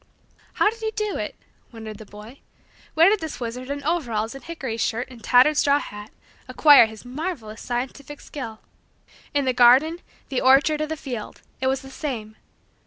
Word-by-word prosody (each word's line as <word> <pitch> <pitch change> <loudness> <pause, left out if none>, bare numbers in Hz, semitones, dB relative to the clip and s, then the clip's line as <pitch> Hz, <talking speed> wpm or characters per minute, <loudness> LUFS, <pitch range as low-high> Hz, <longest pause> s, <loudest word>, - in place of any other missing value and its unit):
How 420 - +3
did 455 - -12
he 440 -1 -2
do 425 -1 -2
it - - -4 0.4
wondered 220 -2 -9
the 220 - -11
boy 210 +6 -12 0.6
where 330 +2 +6
did 430 - +2
this 320 -1 -6
wizard 250 +2 -5
in 285 0 -4
overalls 240 -9 -1
and 270 - -11
hickory 275 -9 -5
shirt 230 +1 -1
and 235 -3 -13
tattered 260 +4 +5
straw 285 -1 +4
hat 210 -5 -8 0.4
acquire 290 -7 +7
his 220 +1 -12
marvelous 250 -5 -5
scientific 265 +4 -5
skill? 230 -7 -8 0.7
In 285 -1 +2
the 255 - +1
garden, 255 +7 +5 0.3
the 260 - -1
orchard, 280 +4 +4
or 305 - -1
the 315 +1 -4
field, 245 -7 -7 0.2
it 260 - +1
was 265 0 0
the 270 - -11
same. 230 -7 -5
260 Hz, 175 wpm, -23 LUFS, 230-300 Hz, 0.7 s, acquire